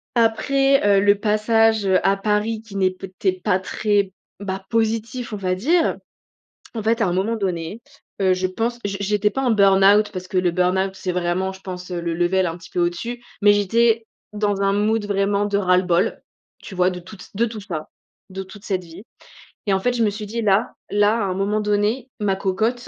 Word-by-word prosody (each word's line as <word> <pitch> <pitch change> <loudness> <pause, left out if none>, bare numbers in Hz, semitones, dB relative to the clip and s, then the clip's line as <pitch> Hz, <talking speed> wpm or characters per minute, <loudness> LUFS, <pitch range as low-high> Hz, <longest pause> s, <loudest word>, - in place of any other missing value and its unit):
après, 270 +3 +3
heu, - - +1
le 205 0 +4
passage, 220 +1 +2
heu, 190 -1 +4
à 195 - +4
Paris 210 +2 0
qui 220 -3 -13
n'est 190 -1 +2
peut 185 0 -10
être 185 -2 +1
pas 190 -3 +2
très 200 0 0 0.3
bah, 190 -1 -5
positif, 225 +1 -1
on 210 - -2
va 185 -2 -1
dire. 320 - +2 0.8
En 220 - -3
fait 230 +2 +1
à 200 - +3
un 175 - 0
moment 195 +5 0
donné, 185 +2 -3 0.4
heu, 190 -1 +4
je 185 0 -1
pense, 230 +6 -2
je 200 -1 -2
j'étais 210 +1 +1
pas 270 - -3
en 255 -3 +2
burn-out 200 0 +5
parce 185 -1 -6
que 185 -1 -2
le 180 -1 +2
burn-out 190 +2 0
c'est 185 -1 -3
vraiment, 180 +2 -1
je 190 - -14
pense, 180 -1 -7
le 170 -1 -2
level 175 +2 +1
un 165 -1 -3
petit 170 - -14
peu - - -3
au-dessus, 230 +8 -2 0.2
mais 205 0 +6
j'étais 225 +3 +2 0.3
dans 205 -1 -1
un 195 0 +2
mood 215 +2 +1
vraiment 200 0 +1
de 205 -1 0
ras-le-bol, 180 0 +2 0.4
tu 195 - -10
vois 180 0 +3
de 180 - -6
tout 185 +5 -12
t 185 - -12
de 230 +4 +2
tout 220 -2 -6
ça, 165 -6 -6 0.4
de 190 0 -6
toute 195 +2 -14
cette 185 -3 -2
vie, 170 +3 -12 0.6
et 200 - +3
en 190 - +2
fait, 245 +6 0
je 235 -1 +1
me 215 - +3
suis 210 +1 -6
dit: 230 +3 -4
«Là, 205 +1 +2 0.2
là, 205 +1 +3
à 210 - 0
un 190 - -1
moment 200 +2 0
donné, 210 +5 0
ma 200 -2 +1
cocotte, 220 +6 -1
200 Hz, 215 wpm, -21 LUFS, 185-220 Hz, 0.8 s, mais